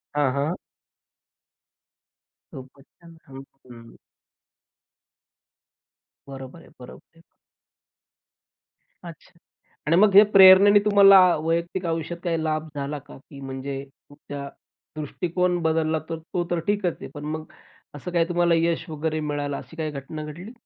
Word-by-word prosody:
हां, 145 Hz, -3 st, +1 dB
हां. 145 Hz, +5 st, -2 dB, 2.0 s
खुपचं 140 Hz, +6 st, -15 dB
छान! 135 Hz, -1 st, -13 dB, 0.3 s
हं, 125 Hz, -, -13 dB
हं. 115 Hz, 0 st, -15 dB, 2.3 s
बरोबर 135 Hz, +3 st, -10 dB
आहे, -, -, -18 dB
बरोबर 125 Hz, +6 st, -15 dB
आहे. 165 Hz, -, -20 dB, 1.8 s
अच्छा 170 Hz, 0 st, -14 dB, 0.5 s
आणि 165 Hz, -, +3 dB
मग 200 Hz, +1 st, +4 dB
हे 205 Hz, -, +10 dB
प्रेरणेने 195 Hz, +1 st, +8 dB
तुम्हाला 200 Hz, -2 st, +7 dB, 0.2 s
वैयक्तिक 170 Hz, +3 st, -2 dB
आयुष्यात 165 Hz, +1 st, -3 dB
काही 165 Hz, -2 st, -1 dB
लाभ 155 Hz, 0 st, -2 dB
झाला 145 Hz, +1 st, -4 dB
का? 145 Hz, +1 st, -15 dB
की 140 Hz, +1 st, -15 dB
म्हणजे 135 Hz, +1 st, -6 dB
तुमचा 140 Hz, 0 st, -11 dB, 0.5 s
दृष्टिकोन 175 Hz, +4 st, -2 dB
बदलला 160 Hz, 0 st, 0 dB
तर 165 Hz, -, -3 dB, 0.2 s
तो 175 Hz, -, 0 dB
तर 175 Hz, -, 0 dB
ठीकच 205 Hz, -4 st, -1 dB
आहे. -, -, -7 dB
पण 145 Hz, 0 st, -9 dB
मग 155 Hz, +1 st, -5 dB, 0.5 s
असं 180 Hz, +5 st, -7 dB
काय 170 Hz, -1 st, +2 dB
तुम्हाला 175 Hz, -1 st, +2 dB
यश 165 Hz, +1 st, -1 dB
वगैरे 155 Hz, 0 st, -3 dB
मिळालं 145 Hz, -2 st, -3 dB
अशी -, -, -12 dB
काही 160 Hz, -2 st, -4 dB
घटना 145 Hz, +2 st, -7 dB
घडली? 170 Hz, +8 st, -9 dB
160 Hz, 130 wpm, -23 LUFS, 145-175 Hz, 2.3 s, हे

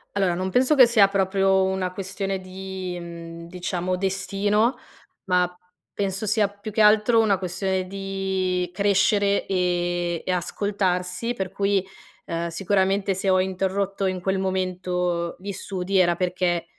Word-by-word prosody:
Allora, 190 Hz, -3 st, +2 dB
non 185 Hz, +2 st, -2 dB
penso 255 Hz, +9 st, +3 dB
che 255 Hz, -4 st, +8 dB
sia 220 Hz, -4 st, +5 dB
proprio 195 Hz, 0 st, +2 dB
una 190 Hz, -1 st, -1 dB
questione 195 Hz, 0 st, -3 dB
di, 185 Hz, -1 st, -6 dB
mhmm, 170 Hz, -1 st, -9 dB
diciamo 180 Hz, +1 st, -2 dB
destino, 195 Hz, +5 st, +1 dB, 0.5 s
ma 180 Hz, -1 st, +2 dB, 0.4 s
penso 195 Hz, 0 st, -2 dB
sia 210 Hz, -1 st, +2 dB
più 205 Hz, +2 st, -9 dB
che 220 Hz, -, +1 dB
altro 215 Hz, +2 st, +5 dB
una 205 Hz, -3 st, +2 dB
questione 190 Hz, 0 st, -2 dB
di 190 Hz, -2 st, -2 dB
crescere 200 Hz, +1 st, +2 dB
e 175 Hz, -2 st, 0 dB
e -, -, 0 dB
ascoltarsi. 185 Hz, +3 st, -1 dB
Per 190 Hz, -6 st, -4 dB
cui, 200 Hz, -1 st, +1 dB, 0.4 s
ehm, 170 Hz, 0 st, -3 dB
sicuramente 195 Hz, +2 st, +1 dB
se 190 Hz, +1 st, -1 dB
ho 185 Hz, 0 st, +4 dB
interrotto 190 Hz, +1 st, -1 dB
in 185 Hz, -1 st, -1 dB
quel 190 Hz, +2 st, -1 dB
momento 180 Hz, -2 st, -1 dB
gli 200 Hz, +2 st, -5 dB
studi 190 Hz, 0 st, -2 dB
era 175 Hz, -2 st, +4 dB
perché, 180 Hz, -2 st, 0 dB
190 Hz, 140 wpm, -24 LUFS, 180-200 Hz, 0.5 s, che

